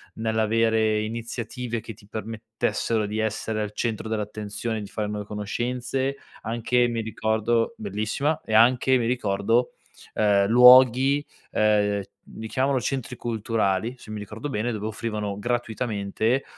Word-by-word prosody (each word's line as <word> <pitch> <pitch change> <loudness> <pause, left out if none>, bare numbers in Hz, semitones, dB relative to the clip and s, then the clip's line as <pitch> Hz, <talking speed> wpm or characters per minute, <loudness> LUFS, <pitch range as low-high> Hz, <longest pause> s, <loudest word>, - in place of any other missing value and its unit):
nell'avere 110 -1 +1
iniziative 115 +1 -4
che 115 0 -8
ti 100 -1 -19
permettessero 110 0 -2
di 105 +2 -3
essere 110 0 -2
al 105 -1 -3
centro 110 -1 -2
dell'attenzione, 105 +1 -3
di 100 - -7
fare 105 -2 -3
nuove 105 -1 -4
conoscenze. 125 +6 -2 0.2
Anche, 120 +2 +1
mi 115 -1 -2
ricordo 110 - 0
bellissima, 150 - -2
e 110 - -5
anche, 125 +3 +5
mi 120 - -1
ricordo, 115 0 +1 0.4
ehm, 100 -2 +3
luoghi, 130 +4 +7 0.3
ehm, 105 -1 +2 0.3
li 110 0 -6
chiamano 135 +2 +1
"centri 125 0 -3
culturali", 110 -1 -1
se 110 - -14
mi 105 - -4
ricordo 110 +7 -6
bene, 120 0 -1
dove 105 -1 -3
offrivano 105 -2 -3
gratuitamente, 115 0 -1
110 Hz, 130 wpm, -25 LUFS, 105-120 Hz, 0.4 s, luoghi